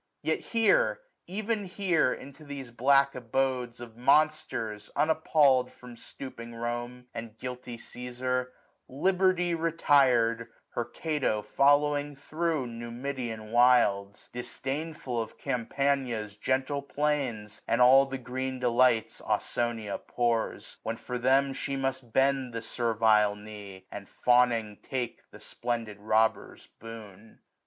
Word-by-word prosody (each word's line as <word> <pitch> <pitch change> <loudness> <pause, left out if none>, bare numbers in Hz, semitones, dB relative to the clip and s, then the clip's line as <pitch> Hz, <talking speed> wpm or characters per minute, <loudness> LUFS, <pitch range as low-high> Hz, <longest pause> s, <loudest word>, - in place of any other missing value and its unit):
950 - - -2
Yet 230 -1 -2
here, - - +4 0.3
even 215 +2 -2
here, 180 -7 +1
into 140 +3 -8
these 140 -4 -7
black 140 +3 +4
abodes 125 0 -1
Of 120 -2 -10
monsters, 130 -6 +1
unappallM, 150 -4 +3
from 125 -1 -13
stooping 115 -1 -9
Rome, 120 +1 -4
And 115 -1 -7
guilty 125 -1 -6
Caesar, 125 +1 -3 0.4
Liberty 180 +4 +2
retired, 135 -8 +3 0.2
Her 120 - -3
Cato 130 -4 -1
following 145 +1 +2
thro' 155 0 -2
Numidian 120 -1 -5
wilds: 115 -5 +3
Disdainful 135 +1 -4
of 110 - -8
Campania's 125 -3 -1
gentle 130 +5 -1
plains, 140 -8 -2
955 - - 0
And 120 - +3
all 135 +2 +7
the 135 0 -4
green 130 +1 -4
delights 125 -2 +2
Ausonia 115 -4 -1
pours; 120 -2 -2
When 115 +1 -3
for 125 +1 -5
them 135 +2 +3
she 140 +1 -3
must 135 -3 -3
bend 135 -1 +2
the 115 0 -4
servile 110 -3 +2
knee. 105 -3 -10
And 100 -1 -8
fawning 120 -4 +2
take 125 -3 -5
the - - -14
splendid 115 -4 -4
robber's 110 +1 0
boon. 110 -1 -11
125 Hz, 120 wpm, -29 LUFS, 115-140 Hz, 0.4 s, all